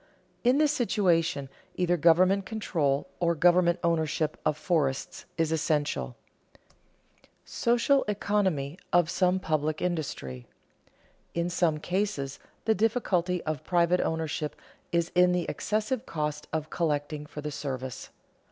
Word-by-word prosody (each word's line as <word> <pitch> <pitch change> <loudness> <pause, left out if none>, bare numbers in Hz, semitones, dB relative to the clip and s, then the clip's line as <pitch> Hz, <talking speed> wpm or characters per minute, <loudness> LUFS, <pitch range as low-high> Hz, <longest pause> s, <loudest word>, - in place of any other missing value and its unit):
In 250 +3 +4
this 300 -1 +4
situation 175 - +1 0.3
either 175 -1 +2
government 180 +4 +4
control 170 -8 -1
or 170 -1 +2
government 175 +1 +4
ownership 160 -2 0
of 155 -1 +1
forests 150 -5 -1
is 165 -1 +1
essential. 150 - 0 0.4
[Sidenote: - - -32
Social 240 +4 +2
economy 190 -7 0
of 175 -2 +3
some 180 0 +2
public 155 -3 -1
industry] 140 - -3 0.9
In 170 +1 0
some 170 -3 +2
cases 175 -5 -2 0.3
the 220 - +4
difficulty 185 -5 0
of 155 -1 -3
private 175 +1 +2
ownership 160 -2 -2 0.4
is 170 0 +1
in 180 0 +5
the 180 -1 0
excessive 220 +4 -2
cost 150 -1 -3
of 155 -1 -3
collecting 150 -2 -1
for 150 - -7
the 150 0 -4
service. 130 -3 -5
170 Hz, 125 wpm, -28 LUFS, 150-185 Hz, 0.9 s, in